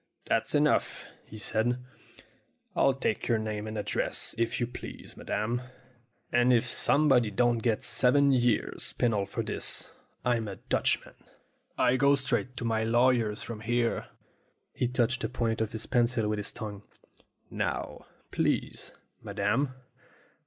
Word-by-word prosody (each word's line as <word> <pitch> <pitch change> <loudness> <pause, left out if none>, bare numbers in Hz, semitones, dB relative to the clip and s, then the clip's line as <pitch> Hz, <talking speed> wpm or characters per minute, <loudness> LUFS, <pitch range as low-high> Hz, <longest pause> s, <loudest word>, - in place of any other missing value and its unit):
"That's - - 0
enough," - - +1 0.2
he 110 - -10
said; 110 +3 0 1.0
"I'll 135 - +4
take 110 -5 -1
your 115 - +3
name 110 -1 -3
and 110 0 -5
address, 105 0 -1
if 115 +1 0
you 120 - +1
please, 120 - -9
madam. 115 +4 -2 0.7
And 120 +1 +4
if 120 -2 +4
somebody 135 -6 +3
don't 120 +3 +2
get 110 -1 0
seven 140 +2 +3
years' 120 -4 +1
penal 105 -5 +1
for - - -3
this, - - -2 0.3
I'm 120 -3 +1
a 100 - -5
Dutchman. - - -1 0.6
I 125 - +4
go 140 +2 +5
straight 130 -2 -1
to 120 - -3
my 110 -1 +1
lawyer's 115 -2 +2
from 115 -2 -6
here." 120 +1 0 0.7
He 125 - 0
touched 125 +1 0
the - - -1
point 115 -2 -1
of 110 - -1
his 110 0 -4
pencil 120 -3 +2
with 105 0 0
his 105 - -2
tongue. 105 -2 -6 0.7
"Now, - - -3 0.2
please, - - -1 0.3
madam 115 +8 0
?" - - -27
120 Hz, 145 wpm, -29 LUFS, 110-125 Hz, 1.0 s, go